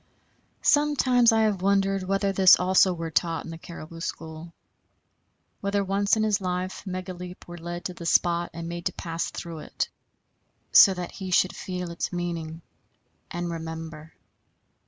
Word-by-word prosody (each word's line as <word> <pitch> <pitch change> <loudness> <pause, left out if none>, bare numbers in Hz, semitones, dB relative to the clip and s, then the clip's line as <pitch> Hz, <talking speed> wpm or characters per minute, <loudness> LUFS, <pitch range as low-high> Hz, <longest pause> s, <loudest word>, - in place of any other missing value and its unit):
Sometimes 265 -5 +4
I 225 0 +3
have 205 -4 +1
wondered 195 0 +2
whether 195 +1 0
this 190 -1 +7
also 185 +1 +4
were 165 -2 -4
taught 165 -1 0
in 165 - -7
the 165 - -7
caribou 165 -1 -10
school; 160 0 -6 1.1
whether 200 0 0
once 200 +2 +1
in 215 - +1
his 210 -2 +1
life 185 0 -3
Megaleep 180 -1 -6
were 175 0 -9
led 175 +1 -6
to 180 - -3
the 170 -1 -7
spot 170 +1 +2
and 165 0 -6
made 170 0 -3
to - - -3
pass 165 -1 -3
through 165 -2 -7
it, - - -3 0.8
so 195 - +8
that 180 -1 -5
he 190 -2 -7
should 185 +1 +3
feel 180 -2 -5
its 170 - -3
meaning 170 -2 -4 0.7
and 175 0 -3
remember. 160 -1 -7
180 Hz, 155 wpm, -26 LUFS, 165-195 Hz, 1.1 s, so